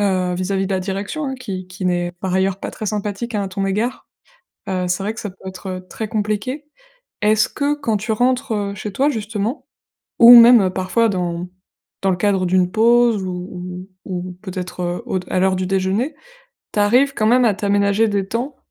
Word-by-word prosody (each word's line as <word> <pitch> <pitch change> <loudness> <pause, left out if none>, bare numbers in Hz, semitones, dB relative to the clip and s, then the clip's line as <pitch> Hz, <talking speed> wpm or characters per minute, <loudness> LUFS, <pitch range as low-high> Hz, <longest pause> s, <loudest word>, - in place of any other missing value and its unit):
heu, 185 -3 +1
vis-à-vis 190 +1 -1
de - - -2
la - - 0
direction, 200 +10 -4
hein, 265 - -3
qui 185 -5 -5
qui 185 +1 -8
n'est 175 -1 0
par 185 -1 -2
ailleurs 190 0 +1
pas - - -4
très 215 - -6
sympathique, 210 +3 -3
hein, 205 - 0
à - - -4
ton 195 +1 -2
égard, 215 +6 -2 0.6
heu, 185 -1 -1
c'est 185 +2 -1
vrai 215 +2 -2
que - - -7
ça 205 - -5
peut 190 0 -11
être, 190 +1 -8
heu, 185 0 -7
très 220 - -5
compliqué. 215 +7 -2 0.6
Est-ce 215 0 +3
que, 285 0 -1
quand 235 -7 -1
tu 220 +2 -2
rentres, 255 +2 +1
heu, 200 -1 -2
chez 205 +1 -5
toi 275 +7 +2
justement 220 +1 -3 0.5
ou 240 +1 +10
même 230 -5 +7
parfois 190 +5 +1
dans 180 -1 -3 0.5
dans 195 - +2
le - - -1
cadre 195 -2 +1
d'une 180 0 +2
pause 235 -2 +4
ou 180 0 -6 0.2
ou 180 -2 -3
ou 180 - -12
peut-être, 185 -2 -6
heu, 175 0 -3
au 190 - -1
d 180 - -14
à - - +1
l'heure 190 0 +2
du 185 0 -2
déjeuner, 195 +10 0 0.6
tu 210 - 0
arrives 255 +7 +3
quand 215 - 0
même 250 +1 +4
à 210 - +3
t'aménager 200 +2 +2
des 200 -2 -1
temps 255 +5 -3
200 Hz, 210 wpm, -20 LUFS, 185-225 Hz, 0.6 s, ou